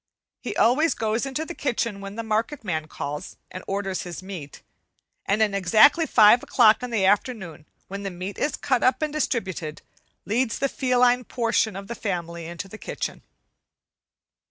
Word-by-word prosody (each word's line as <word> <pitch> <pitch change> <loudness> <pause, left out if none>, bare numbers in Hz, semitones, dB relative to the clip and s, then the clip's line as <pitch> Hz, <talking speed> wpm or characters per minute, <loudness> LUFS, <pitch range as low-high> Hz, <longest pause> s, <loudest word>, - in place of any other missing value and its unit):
He - - -5
always 295 +8 +3
goes 225 +4 -1
into 270 +4 -3
the 345 - -6
kitchen 230 -8 -2
when 195 +1 -7
the 230 - -4
market 225 +5 -1
man 160 -6 -2
calls, 150 +3 -6
and 185 - -7
orders 195 -1 -2
his 175 0 -7
meat; 175 -7 -9 0.6
and 210 +2 +3
at 210 -2 0
exactly 220 - +5
five 220 0 +6
o'clock 225 -3 +4
in 250 - -4
the 215 -5 +1
afternoon, 190 - 0 0.2
when 200 +1 -6
the 200 - -3
meat 185 +2 -6
is 295 - 0
cut 255 -3 0
up 255 +4 +2
and 305 -1 -2
distributed, 190 - -3 0.4
leads 230 +2 0
the 275 - 0
feline 250 -1 +2
portion 230 -3 0
of 195 0 -7
the 235 - -4
family 170 -6 -4
into 170 +3 -6
the 215 +3 -11
kitchen. - - -5
215 Hz, 170 wpm, -24 LUFS, 185-250 Hz, 0.6 s, five